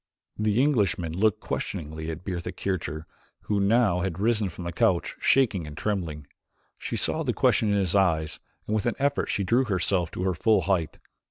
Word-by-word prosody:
The 105 Hz, +1 st, +1 dB
Englishman 100 Hz, -, +1 dB
looked 105 Hz, +2 st, +2 dB
questioningly 80 Hz, 0 st, -4 dB
at 80 Hz, +2 st, -6 dB
Bertha 90 Hz, -3 st, -3 dB
Kircher, 80 Hz, -5 st, -3 dB, 0.4 s
who 105 Hz, -1 st, -1 dB
had 100 Hz, -, +2 dB
now 105 Hz, -5 st, +3 dB
risen 100 Hz, +3 st, 0 dB
from 90 Hz, -, -9 dB
the 85 Hz, -, -3 dB
couch, 85 Hz, +1 st, +1 dB
shaking 105 Hz, -, +2 dB
and 75 Hz, -1 st, -9 dB
trembling. 85 Hz, -8 st, -3 dB, 0.5 s
She -, -, -3 dB
saw -, -, 0 dB
the -, -, 0 dB
question 110 Hz, -, +3 dB
in 100 Hz, -, +2 dB
his 95 Hz, -2 st, +1 dB
eyes 80 Hz, -5 st, +1 dB, 0.3 s
and 105 Hz, -, -3 dB
with 110 Hz, +1 st, 0 dB
an 120 Hz, -, 0 dB
effort 140 Hz, +1 st, 0 dB
she 100 Hz, -, 0 dB
drew 120 Hz, +8 st, +3 dB
herself 95 Hz, -4 st, 0 dB
to 90 Hz, -, -3 dB
her 95 Hz, -1 st, +1 dB
full 105 Hz, +4 st, +3 dB
height. 85 Hz, -3 st, -1 dB
95 Hz, 185 wpm, -26 LUFS, 85-105 Hz, 0.5 s, now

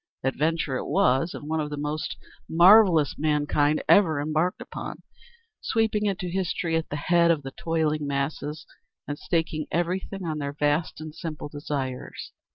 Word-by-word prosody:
Adventure 150 Hz, 0 st, 0 dB
it -, -, -5 dB
was, 135 Hz, +7 st, +2 dB
and 145 Hz, -, -8 dB
one 160 Hz, +1 st, -1 dB
of 150 Hz, -1 st, -2 dB
the 145 Hz, -, -5 dB
most 150 Hz, +1 st, -3 dB, 0.3 s
marvellous 175 Hz, -3 st, +6 dB
mankind 150 Hz, 0 st, +1 dB
ever 160 Hz, -7 st, +5 dB
embarked 155 Hz, +5 st, 0 dB
upon, -, -, -7 dB, 0.6 s
sweeping 220 Hz, -2 st, +1 dB
into 190 Hz, -2 st, -2 dB
history 175 Hz, -2 st, -1 dB
at 165 Hz, 0 st, -1 dB
the -, -, -3 dB
head 170 Hz, +3 st, +3 dB
of 160 Hz, -4 st, +2 dB
the 135 Hz, -, -6 dB
toiling 155 Hz, -2 st, -1 dB
masses, 140 Hz, +2 st, -3 dB, 0.4 s
and 145 Hz, 0 st, -4 dB
staking 160 Hz, -2 st, -1 dB
everything 180 Hz, +3 st, -2 dB
on 155 Hz, -2 st, -2 dB
their 140 Hz, -1 st, -3 dB
vast 150 Hz, +3 st, 0 dB
and 155 Hz, -1 st, -7 dB
simple 155 Hz, -2 st, -6 dB
desires. 140 Hz, -3 st, -5 dB
155 Hz, 155 wpm, -26 LUFS, 145-170 Hz, 0.6 s, marvellous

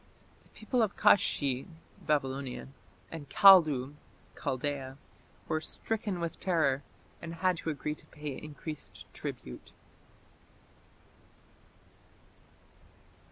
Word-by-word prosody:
The -, -, -26 dB
people 235 Hz, +3 st, -1 dB
of 215 Hz, -3 st, 0 dB
Kashshi 135 Hz, -8 st, +3 dB, 0.4 s
(Babylonia) 135 Hz, -3 st, -1 dB, 0.4 s
and 155 Hz, -4 st, -8 dB
Kaldu 155 Hz, -9 st, +7 dB, 0.4 s
(Chaldaea) 135 Hz, 0 st, -3 dB, 0.5 s
were 155 Hz, 0 st, 0 dB
"stricken 210 Hz, 0 st, -3 dB
with 170 Hz, -1 st, -4 dB
terror", 160 Hz, -7 st, +2 dB, 0.4 s
and 170 Hz, 0 st, -6 dB
had 185 Hz, +1 st, +1 dB
to 165 Hz, -, -4 dB
agree 150 Hz, 0 st, -2 dB
to -, -, -15 dB
pay 150 Hz, -2 st, -6 dB
increased 155 Hz, +1 st, -7 dB
tribute. 65 Hz, -, -7 dB
150 Hz, 90 wpm, -31 LUFS, 135-170 Hz, 0.5 s, Kaldu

